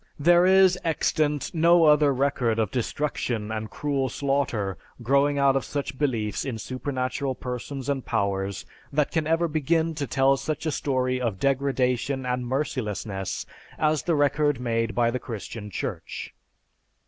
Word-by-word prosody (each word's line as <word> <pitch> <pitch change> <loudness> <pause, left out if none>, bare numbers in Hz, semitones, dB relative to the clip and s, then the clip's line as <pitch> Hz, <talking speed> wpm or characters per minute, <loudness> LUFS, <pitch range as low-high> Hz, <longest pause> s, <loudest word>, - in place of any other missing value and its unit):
There 175 +4 +5
is 190 -1 +5
extant 150 -2 0
no 170 +1 +5
other 150 -1 +5
record 130 -4 +1
of 110 -3 0
destruction 120 -4 -2
and 110 0 -4
cruel 140 -3 -1
slaughter 125 -8 -1 0.3
growing 140 +3 +3
out 140 -1 +4
of 135 - +1
such 140 -2 -4
beliefs 115 -8 -1
in 130 -5 -4
supernatural 130 +2 -3
persons 125 +2 -5
and 140 -2 -1
powers 100 -1 -1 0.3
that 150 0 +1
can 160 -2 0
ever 165 +1 +2
begin 160 +2 +1
to 145 -3 -3
tell 135 +1 +3
such 150 +4 -4
a 155 - +1
story 130 -3 0
of 110 -6 -2
degradation 135 0 0
and 125 -1 -2
mercilessness 110 -8 -3 0.3
as 155 -1 +2
the 170 - 0
record 145 -1 +2
made 115 -2 -1
by 120 -1 +3
the 125 - -2
Christian 110 -3 -7
Church. 95 - -5
135 Hz, 150 wpm, -25 LUFS, 120-150 Hz, 0.3 s, There